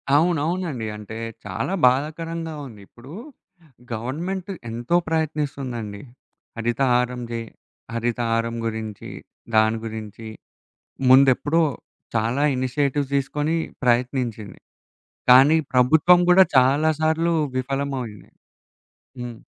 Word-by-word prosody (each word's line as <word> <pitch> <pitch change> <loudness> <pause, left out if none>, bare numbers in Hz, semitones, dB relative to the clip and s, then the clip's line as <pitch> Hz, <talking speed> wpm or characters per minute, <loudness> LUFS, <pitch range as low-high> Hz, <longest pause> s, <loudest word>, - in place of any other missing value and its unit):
అవునవునండి. 160 -5 0
అంటే 110 +1 -8 0.3
చాలా 100 - -3
బాధాకరంగా 160 +4 -2
ఉంది. 105 -4 -13
ఇప్పుడు 125 +4 -15 0.8
గవర్నమెంట్ 170 - -4 0.2
ఎంతో 120 +8 -1
ప్రయత్నిస్తుందండి. 140 -9 -3 0.6
హరితహారం 125 +1 +1
జే 115 - -2 0.5
హరితహారం 115 0 -1
గురించి, 110 -2 -5 0.5
దాని 110 +1 +4
గురించి 110 0 -7 0.8
ముందెప్పుడో 140 +5 +5 0.5
చాలా 115 +5 0
ఇనిషియేటివ్స్ 140 +2 -1
తీసుకొని 145 +4 -1 0.3
ప్రయత్నించింది. 120 -3 -1 0.7
కానీ 135 +5 +7 0.2
ప్రభుత్వం 160 +8 +5
గూడా 185 +1 +7
చాలా 140 +5 +4
సార్లు 160 +2 +1 0.2
విఫలమయింది. 130 -5 -4 0.9
హ్మ్. 120 -2 -6
130 Hz, 85 wpm, -23 LUFS, 115-155 Hz, 0.9 s, కానీ